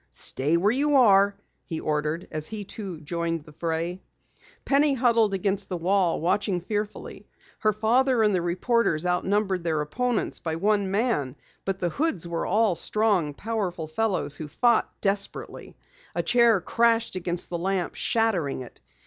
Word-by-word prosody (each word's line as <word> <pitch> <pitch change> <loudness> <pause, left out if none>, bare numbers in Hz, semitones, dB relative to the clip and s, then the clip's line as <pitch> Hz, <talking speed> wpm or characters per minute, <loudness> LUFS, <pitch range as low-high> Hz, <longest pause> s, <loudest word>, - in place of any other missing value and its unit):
"Stay 150 +5 +1
where 200 +5 +3
you 290 +4 +1
are!" 200 -5 +5 0.3
he 160 -2 -5
ordered 150 +2 -2
as 155 -1 -4
he 215 -2 -6
too 195 -4 -7
joined 165 0 -3
the 150 - -13
fray. 165 +3 -3 0.6
Penny 280 0 +3
huddled 230 -5 +3
against 195 +1 -2
the 180 - -2
wall, 180 0 +1
watching 185 +2 0
fearfully. 210 +3 -5 0.3
Her 215 - +3
father 230 +3 +2
and 210 -1 +3
the 180 - +1
reporters 175 -1 +1
outnumbered 190 +1 0
their 160 -2 0
opponents 225 +11 -1
by 160 -1 -3
one 200 +2 +1
man, 195 - 0 0.3
but 195 -1 -1
the 175 -2 -1
Hoods 200 - -1
were 170 -1 -3
all 210 +1 +3
strong, 185 -4 +1
powerful 195 -6 -3
fellows 180 -2 -1
who 155 - -6
fought 235 - +2
desperately. 200 0 -3 0.4
A - - 0
chair 235 -5 +4
crashed 230 +2 +1
against 175 -1 -3
the 170 - -2
lamp, 190 0 -1
shattering 190 - 0
it. 125 - -12
195 Hz, 155 wpm, -25 LUFS, 170-220 Hz, 0.6 s, are